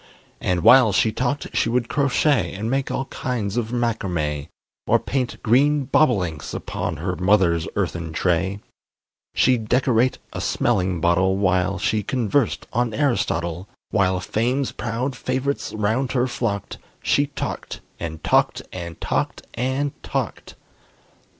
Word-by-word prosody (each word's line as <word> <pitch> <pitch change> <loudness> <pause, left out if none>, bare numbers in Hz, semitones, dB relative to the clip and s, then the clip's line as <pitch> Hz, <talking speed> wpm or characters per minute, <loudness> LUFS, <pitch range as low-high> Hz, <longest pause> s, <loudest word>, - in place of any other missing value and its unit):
And 90 -2 0
while 125 -4 +7
she 110 +3 +3
talked 130 +5 -2
she - - +2
would 120 0 +1
crochet, 140 -1 +1
And 110 +4 -3
make 135 0 0
all 135 - -2
kinds 115 -7 -3
of 120 -2 -1
macrame, 90 -12 -1 0.4
Or - - +5
paint 130 -2 -2
green 140 +5 +3
bobolinks 90 - +1
upon 90 -5 -3
Her 90 +4 -2
mother's 90 -4 +3
earthen 85 -2 -2
tray; 90 +4 0 0.7
She'd 120 -4 +2
decorate 125 0 +3 0.2
a - - -4
smelling 90 -2 0
bottle 90 +3 +3
While 95 0 +1
she 105 +3 0
conversed 120 +3 0
on 120 -1 0
Aristotle; 90 - 0 0.2
While 95 -2 +2
fame's 125 +8 0
proud 120 +5 -3
favorites 130 +2 -2
round 110 +5 0
her 125 -2 +2
flocked, 115 -5 -3 0.2
She 145 0 +2
talked 140 - -5 0.2
and 80 -2 -6
talked - - +2
and 85 -2 -6
talked - - -2
and 130 +3 -1
talked! - - -4
110 Hz, 130 wpm, -22 LUFS, 90-130 Hz, 0.7 s, while